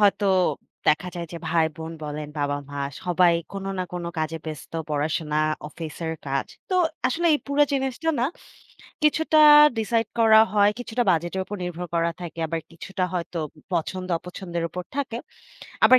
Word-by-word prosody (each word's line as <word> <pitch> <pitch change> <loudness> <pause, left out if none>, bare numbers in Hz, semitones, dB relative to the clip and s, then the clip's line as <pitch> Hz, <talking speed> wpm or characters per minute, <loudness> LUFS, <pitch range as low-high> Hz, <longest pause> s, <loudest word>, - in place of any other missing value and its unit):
হয়তো 200 0 +4 0.6
দেখা 165 +4 +3
যায় 170 -1 -4
যে - - -5
ভাই-বোন 160 0 0
বলেন, 150 0 -5
বাবা-মা 145 0 -2 0.2
সবাই 180 -1 +4 0.2
কোন 195 -1 -5
না 185 - 0
কোন 175 -1 -4
কাজে 155 +1 -1
ব্যস্ত, 155 -1 -7 0.2
পড়াশোনা, 150 +1 0 0.3
অফিসের 160 +1 -5
কাজ। 135 0 -1 0.2
তো - - +1 0.3
আসলে 335 +7 0
এই 295 - +1
পুরো 280 +1 +3
জিনিসটা 270 +4 0
না, - - +3 0.8
কিছুটা 310 +1 +3 0.4
ডিসাইড 225 0 +1
করা 220 -1 +7
হয়, 205 -1 +5
কিছুটা 245 0 -1
বাজেটের 175 +3 0
উপর 205 - -6
নির্ভর 180 0 -4
করা 170 0 +2
থাকে। 170 -1 -7
আবার 165 +1 -2
কিছুটা 185 +3 -3
হয়তো 175 -1 -3 0.3
পছন্দ-অপছন্দের 175 0 -2
উপর 180 +2 -5
থাকে। 270 -5 -2 0.7
আবার 255 - +8
175 Hz, 145 wpm, -25 LUFS, 160-210 Hz, 0.8 s, আবার